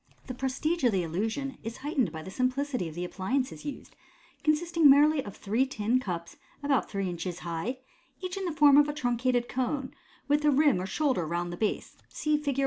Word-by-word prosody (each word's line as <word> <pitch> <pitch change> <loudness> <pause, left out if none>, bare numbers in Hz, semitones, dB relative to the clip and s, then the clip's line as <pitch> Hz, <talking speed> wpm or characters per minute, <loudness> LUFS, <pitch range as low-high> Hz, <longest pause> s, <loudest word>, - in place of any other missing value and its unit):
The 255 - -5
prestige 270 +6 -1
of 245 - +5
the 185 -2 +1
illusion 225 - -3
is 225 +1 -6
heightened 280 -6 +1
by 160 -1 -7
the 190 - -8
simplicity 255 - -1
of 155 - -11
the 175 +1 -3
appliances 255 +11 -2
used, 290 - -7 0.5
consisting 315 0 +4
merely 290 +1 +5
of 205 - -9
three 220 +6 +1
tin 235 0 +1
cups 175 -8 -5 0.3
about 280 -3 +1
three 195 -2 -2
inches 175 0 -4
high, 170 +10 -3 0.4
each 365 -1 -4
in 390 -1 -3
the 350 - -1
form 295 -2 +6
of 295 0 +5
a - - -2
truncated 245 -2 0
cone, 260 +1 -2 0.3
with 295 +1 +2
a 300 - +5
rim 285 -8 +4
or 185 - -4
shoulder 255 - 0
round 175 +1 -2
the - - -4
base 215 +3 -2
(see 305 -1 0
Fig. 285 -2 -1
255 Hz, 200 wpm, -29 LUFS, 195-290 Hz, 0.5 s, form